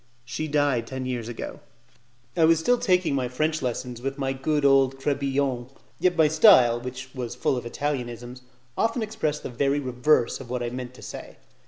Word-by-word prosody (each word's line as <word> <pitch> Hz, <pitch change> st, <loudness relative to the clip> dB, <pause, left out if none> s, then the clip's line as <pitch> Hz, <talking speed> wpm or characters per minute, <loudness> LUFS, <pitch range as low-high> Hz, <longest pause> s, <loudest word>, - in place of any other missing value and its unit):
She 155 Hz, +6 st, -4 dB
died 145 Hz, -6 st, +1 dB
ten 130 Hz, 0 st, -5 dB
years 120 Hz, -3 st, -3 dB
ago. 120 Hz, -, -6 dB, 0.8 s
I 165 Hz, -, +4 dB
was 165 Hz, +1 st, +5 dB
still 245 Hz, +9 st, +2 dB
taking 185 Hz, -, +2 dB
my 130 Hz, -2 st, 0 dB
French 155 Hz, +5 st, -1 dB
lessons 125 Hz, -1 st, -4 dB
with 135 Hz, +2 st, -3 dB
my 135 Hz, -1 st, -1 dB
good 145 Hz, +2 st, 0 dB
old 135 Hz, -1 st, +4 dB
Crebillon; 135 Hz, -3 st, -1 dB, 0.3 s
yet 180 Hz, -1 st, +2 dB
my 160 Hz, -1 st, +6 dB
style, 125 Hz, -6 st, +6 dB
which 130 Hz, +1 st, -7 dB
was 125 Hz, -3 st, -5 dB
full -, -, 0 dB
of 120 Hz, -1 st, -4 dB
Italianisms, 125 Hz, -2 st, -4 dB, 0.3 s
often 230 Hz, +1 st, 0 dB
expressed 215 Hz, -9 st, -2 dB
the -, -, -4 dB
very 140 Hz, +3 st, +1 dB
reverse 125 Hz, 0 st, +1 dB
of 130 Hz, -3 st, -10 dB
what 125 Hz, 0 st, -2 dB
I 120 Hz, -, -3 dB
meant 125 Hz, 0 st, -6 dB
to -, -, -13 dB
say. -, -, -9 dB
135 Hz, 185 wpm, -25 LUFS, 125-150 Hz, 0.8 s, my